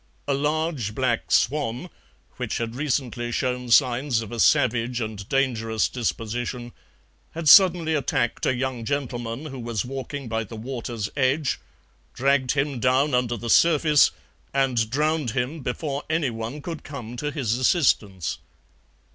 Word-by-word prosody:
A 140 Hz, -, +2 dB
large 150 Hz, -6 st, -1 dB
black 130 Hz, -3 st, -1 dB
swan, 140 Hz, 0 st, +1 dB, 0.5 s
which -, -, -3 dB
had 115 Hz, -1 st, -3 dB
recently 125 Hz, -3 st, -2 dB
shown 125 Hz, 0 st, -2 dB
signs 125 Hz, 0 st, +3 dB
of 110 Hz, -, -10 dB
a 120 Hz, -, -5 dB
savage 120 Hz, +1 st, +3 dB
and 110 Hz, -3 st, -5 dB
dangerous 115 Hz, -5 st, +1 dB
disposition, 120 Hz, +1 st, -3 dB, 0.6 s
had 165 Hz, -1 st, -4 dB
suddenly 170 Hz, -2 st, +7 dB
attacked 130 Hz, -5 st, 0 dB
a 130 Hz, -, +2 dB
young 125 Hz, -2 st, -3 dB
gentleman 120 Hz, -1 st, -3 dB
who 135 Hz, -4 st, -7 dB
was 115 Hz, -3 st, -3 dB
walking 135 Hz, +1 st, -6 dB
by 115 Hz, 0 st, -1 dB
the 110 Hz, +2 st, -10 dB
water's 115 Hz, -2 st, -5 dB
edge, 140 Hz, +1 st, +1 dB, 0.6 s
dragged 135 Hz, -1 st, +2 dB
him 140 Hz, -2 st, -1 dB
down 130 Hz, +4 st, +2 dB
under 125 Hz, -1 st, +1 dB
the 120 Hz, -, -6 dB
surface, 155 Hz, -3 st, +5 dB, 0.5 s
and 125 Hz, -5 st, +1 dB
drowned 150 Hz, +1 st, 0 dB
him 130 Hz, +6 st, -1 dB
before 140 Hz, +2 st, -3 dB
anyone 135 Hz, -3 st, -2 dB
could 165 Hz, -3 st, -6 dB
come 125 Hz, -5 st, -8 dB
to 150 Hz, +4 st, -2 dB
his 135 Hz, -7 st, -1 dB
assistance. 110 Hz, -, +1 dB
125 Hz, 140 wpm, -24 LUFS, 115-145 Hz, 0.6 s, suddenly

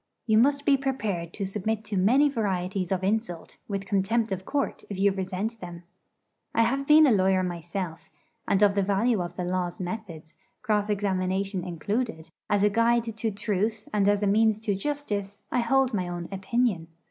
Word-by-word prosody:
You 220 Hz, -1 st, +4 dB
must 280 Hz, +3 st, +3 dB
be 280 Hz, -2 st, +5 dB
prepared 215 Hz, -11 st, -2 dB
to 200 Hz, -, -3 dB
submit 210 Hz, +3 st, -2 dB
to 210 Hz, -, -5 dB
many 240 Hz, +10 st, +4 dB
varieties 190 Hz, -7 st, -2 dB
of 190 Hz, -1 st, 0 dB
insult, 195 Hz, -4 st, -2 dB
with 195 Hz, -1 st, -3 dB
contempt 205 Hz, +3 st, 0 dB
of 190 Hz, 0 st, -3 dB
court 285 Hz, -2 st, -2 dB
if 200 Hz, -, -5 dB
you 200 Hz, +1 st, +3 dB
resent 195 Hz, +4 st, -3 dB
them. 175 Hz, -2 st, -9 dB, 0.7 s
I 230 Hz, -, +5 dB
have 270 Hz, +4 st, 0 dB
been 305 Hz, +1 st, +8 dB
a 275 Hz, -, +4 dB
lawyer 190 Hz, -2 st, +3 dB
myself, 175 Hz, -1 st, -5 dB, 0.4 s
and 200 Hz, +1 st, +3 dB
of 200 Hz, -1 st, +5 dB
the 200 Hz, -, +1 dB
value 200 Hz, +2 st, +1 dB
of 175 Hz, -, -5 dB
the 180 Hz, -, -3 dB
Law's 180 Hz, -1 st, -2 dB
methods, 180 Hz, -4 st, -7 dB, 0.3 s
cross 210 Hz, -1 st, +1 dB
examination 195 Hz, -1 st, -1 dB
included, 180 Hz, 0 st, -3 dB, 0.2 s
as 205 Hz, -1 st, +2 dB
a 210 Hz, -, +5 dB
guide 230 Hz, +1 st, +2 dB
to 225 Hz, 0 st, -2 dB
truth 210 Hz, +1 st, -2 dB
and 200 Hz, -2 st, +2 dB
as 205 Hz, 0 st, +2 dB
a -, -, +2 dB
means 215 Hz, +1 st, +3 dB
to 215 Hz, -2 st, 0 dB
justice, 205 Hz, -4 st, -4 dB
I 250 Hz, -, +1 dB
hold 260 Hz, +2 st, +2 dB
my 185 Hz, -4 st, -1 dB
own 175 Hz, -1 st, -5 dB
opinion. 195 Hz, -2 st, 0 dB
200 Hz, 180 wpm, -26 LUFS, 185-225 Hz, 0.7 s, been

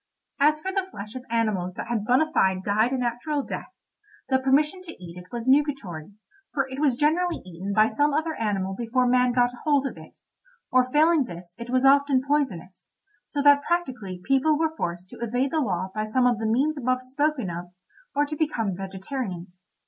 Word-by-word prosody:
As 305 Hz, +2 st, +3 dB
for 380 Hz, -, -3 dB
the 380 Hz, -1 st, -1 dB
flesh 210 Hz, -, -8 dB
of 255 Hz, -1 st, -7 dB
animals 210 Hz, -6 st, 0 dB
that -, -, -5 dB
had 230 Hz, -3 st, -2 dB
bona 285 Hz, +7 st, +3 dB
fide 190 Hz, -1 st, +2 dB
died 215 Hz, +5 st, +2 dB
a 265 Hz, -, 0 dB
natural 250 Hz, +4 st, -1 dB
death, -, -, -6 dB, 0.6 s
the 260 Hz, -1 st, +3 dB
permission 295 Hz, +7 st, +2 dB
to 340 Hz, -3 st, -9 dB
eat 175 Hz, -1 st, -11 dB
it 180 Hz, 0 st, -12 dB
was 235 Hz, 0 st, -5 dB
nugatory, 260 Hz, -, +1 dB, 0.4 s
for 275 Hz, -2 st, +1 dB
it 265 Hz, +1 st, -7 dB
was 285 Hz, -5 st, +3 dB
generally 330 Hz, +5 st, +1 dB
eaten 185 Hz, +2 st, -6 dB
by 215 Hz, +2 st, +4 dB
some 290 Hz, +7 st, +1 dB
other 315 Hz, +2 st, 0 dB
animal 200 Hz, -6 st, -1 dB
before 245 Hz, +3 st, 0 dB
man 250 Hz, 0 st, +3 dB
got 245 Hz, 0 st, +2 dB
hold 285 Hz, -3 st, +2 dB
of 270 Hz, -, -5 dB
it; -, -, -15 dB, 0.5 s
or 255 Hz, 0 st, +3 dB
failing 310 Hz, 0 st, +4 dB
this 175 Hz, -4 st, -10 dB
it 235 Hz, +1 st, -7 dB
was 255 Hz, +1 st, +2 dB
often 275 Hz, -1 st, +4 dB
poisonous, 220 Hz, -, -2 dB, 0.4 s
so 285 Hz, -1 st, -2 dB
that 285 Hz, 0 st, +7 dB
practically 250 Hz, -, -2 dB
people 270 Hz, +3 st, +3 dB
were 320 Hz, 0 st, 0 dB
forced 175 Hz, -, -4 dB
to -, -, -11 dB
evade 245 Hz, +4 st, 0 dB
the 320 Hz, -, +1 dB
law 185 Hz, -6 st, -2 dB
by 215 Hz, 0 st, -2 dB
some 250 Hz, +4 st, +1 dB
of 240 Hz, -3 st, +2 dB
the 220 Hz, -, -1 dB
means 280 Hz, +7 st, +1 dB
above 255 Hz, 0 st, 0 dB
spoken 270 Hz, -, -1 dB
of, 170 Hz, +1 st, -5 dB, 0.5 s
or 290 Hz, +1 st, +3 dB
to 300 Hz, +1 st, -5 dB
become 235 Hz, -, -1 dB
vegetarians. 190 Hz, -2 st, -6 dB
255 Hz, 195 wpm, -25 LUFS, 205-290 Hz, 0.6 s, that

